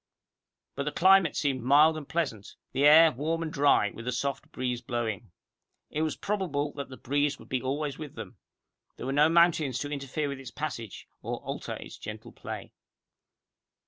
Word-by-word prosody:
But 140 Hz, -, -3 dB
the 150 Hz, -, -1 dB
climate 190 Hz, -2 st, +5 dB
seemed 135 Hz, -4 st, 0 dB
mild 145 Hz, +6 st, +5 dB
and 155 Hz, -3 st, -7 dB
pleasant, 135 Hz, -12 st, -3 dB, 0.2 s
the 135 Hz, +2 st, +2 dB
air 160 Hz, +2 st, +8 dB
warm 160 Hz, +5 st, -2 dB
and 155 Hz, -, -5 dB
dry, 140 Hz, -7 st, +3 dB
with 115 Hz, +1 st, -9 dB
a -, -, +1 dB
soft 140 Hz, +2 st, -3 dB
breeze 125 Hz, -1 st, -2 dB
blowing. 115 Hz, -3 st, -3 dB, 0.6 s
It 155 Hz, -, -1 dB
was 155 Hz, -1 st, 0 dB
probable 160 Hz, -8 st, -2 dB
that 140 Hz, -2 st, -6 dB
the 130 Hz, -, -9 dB
breeze 145 Hz, +2 st, 0 dB
would -, -, -15 dB
be 130 Hz, -1 st, -1 dB
always 140 Hz, +2 st, -2 dB
with 150 Hz, -3 st, -8 dB
them. -, -, -8 dB, 0.6 s
There -, -, -6 dB
were 135 Hz, -, -1 dB
no 150 Hz, +2 st, +5 dB
mountains 165 Hz, -6 st, +3 dB
to 145 Hz, +2 st, -4 dB
interfere 145 Hz, +1 st, -3 dB
with 140 Hz, -1 st, -5 dB
its 135 Hz, -, -8 dB
passage, 130 Hz, -9 st, -6 dB
or -, -, -3 dB
alter -, -, -5 dB
its -, -, -10 dB
gentle 110 Hz, +2 st, -8 dB
play. -, -, -8 dB
145 Hz, 180 wpm, -28 LUFS, 130-155 Hz, 0.6 s, air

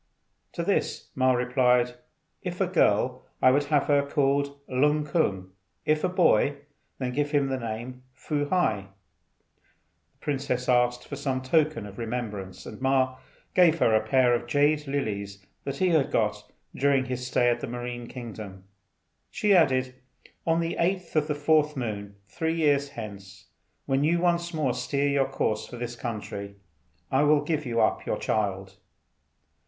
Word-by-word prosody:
To -, -, -3 dB
this -, -, -1 dB
Ma 130 Hz, 0 st, +3 dB
replied, 125 Hz, 0 st, +2 dB, 0.5 s
"If -, -, -5 dB
a -, -, +3 dB
girl -, -, +2 dB, 0.2 s
I 130 Hz, -, +6 dB
would 145 Hz, +2 st, +2 dB
have 145 Hz, -1 st, +2 dB
her 145 Hz, -1 st, +3 dB
called 140 Hz, 0 st, 0 dB
Lung 150 Hz, +4 st, +2 dB
kung; 95 Hz, -, -1 dB, 0.3 s
if 155 Hz, 0 st, +2 dB
a 185 Hz, -, +2 dB
boy, 155 Hz, -, +3 dB, 0.4 s
then 125 Hz, -2 st, -2 dB
name 145 Hz, +3 st, 0 dB
him 125 Hz, -2 st, -3 dB
Fu 145 Hz, +2 st, -2 dB
hai." 110 Hz, -, +1 dB, 1.3 s
The -, -, -39 dB
princess 135 Hz, -3 st, -2 dB
asked 125 Hz, 0 st, +2 dB
for 140 Hz, -, -5 dB
some 135 Hz, -2 st, -2 dB
token 155 Hz, -3 st, +1 dB
of 100 Hz, +1 st, -10 dB
remembrance, 110 Hz, -5 st, -5 dB
and 110 Hz, -, -9 dB
Ma 130 Hz, -1 st, +2 dB, 0.4 s
gave 170 Hz, -3 st, +5 dB
her 115 Hz, -, +3 dB
a 110 Hz, -, +4 dB
pair 125 Hz, +2 st, +3 dB
of 120 Hz, 0 st, -1 dB
jade 145 Hz, +3 st, +2 dB
lilies 100 Hz, -8 st, -3 dB, 0.2 s
that 140 Hz, 0 st, -3 dB
he 185 Hz, +3 st, +2 dB
had 160 Hz, -5 st, +3 dB
got 105 Hz, -1 st, -1 dB, 0.2 s
during 135 Hz, -1 st, +2 dB
his 125 Hz, -1 st, -4 dB
stay 120 Hz, -1 st, +3 dB
in 120 Hz, -, -1 dB
the 140 Hz, -, -5 dB
marine 120 Hz, 0 st, -5 dB
kingdom. 110 Hz, -7 st, -8 dB, 0.7 s
She 210 Hz, -1 st, +2 dB
added, 130 Hz, -6 st, +3 dB, 0.5 s
"On 165 Hz, +1 st, +3 dB
the 165 Hz, 0 st, -2 dB
8th 180 Hz, 0 st, -1 dB
of 155 Hz, -1 st, +2 dB
the 150 Hz, -, -1 dB
4th 150 Hz, 0 st, +2 dB
moon, 100 Hz, -5 st, -4 dB
three 160 Hz, -, -2 dB
years 145 Hz, -3 st, +2 dB
hence, 100 Hz, -5 st, -10 dB, 0.4 s
when 135 Hz, +1 st, +1 dB
you 165 Hz, +3 st, +3 dB
once 170 Hz, -1 st, +1 dB
more 150 Hz, -7 st, 0 dB
steer 140 Hz, +3 st, -1 dB
your 140 Hz, -1 st, +1 dB
course 110 Hz, -5 st, -1 dB
for 125 Hz, -, -9 dB
this 120 Hz, 0 st, -5 dB
country, 105 Hz, -4 st, -6 dB, 0.6 s
I 130 Hz, -, +3 dB
will 150 Hz, 0 st, +4 dB
give 150 Hz, -2 st, -2 dB
you 115 Hz, -1 st, +1 dB
up -, -, +1 dB
your -, -, 0 dB
child." 95 Hz, -3 st, -2 dB
130 Hz, 160 wpm, -27 LUFS, 120-150 Hz, 1.3 s, I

